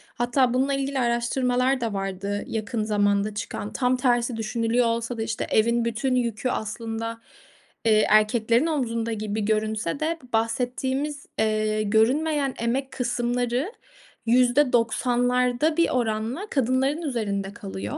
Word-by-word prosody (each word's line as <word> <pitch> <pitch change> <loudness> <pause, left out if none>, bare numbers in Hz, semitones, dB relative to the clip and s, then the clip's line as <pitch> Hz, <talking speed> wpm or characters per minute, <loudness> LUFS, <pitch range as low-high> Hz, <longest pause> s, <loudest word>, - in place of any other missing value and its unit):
Hatta 245 +1 +2
bununla 265 +2 +1
ilgili 275 0 -1
araştırmalar 250 +2 +1
da 225 -3 -1
vardı 195 +1 -3
yakın 220 0 -2
zamanda 205 -1 +1
çıkan. 205 0 -5
Tam 255 0 +1
tersi 240 -2 +1
düşünülüyor 230 +2 0
olsa 230 +1 -2
da, 225 - -1
işte, 225 0 -3
evin 235 +2 +2
bütün 245 +3 0
yükü, 240 0 -1
aslında, 230 0 -4 0.6
eee, 215 -1 +4
erkeklerin 220 +4 +3
omzunda 230 -7 -1
gibi 215 0 -3
görünse 215 -1 -1
de 325 +2 -1
bu 245 - -18
bahsettiğimiz, 260 +5 -1
eee, 215 0 +1
görünmeyen 270 +7 +2
emek 260 +4 -1
kısımları 245 - -1 0.5
%90'larda 245 +2 +2
bir 335 - +3
oranla 235 - -1
kadınların 270 +3 +1
üzerinde 205 - -2
kalıyor, 190 - -6
235 Hz, 125 wpm, -25 LUFS, 220-255 Hz, 0.6 s, eee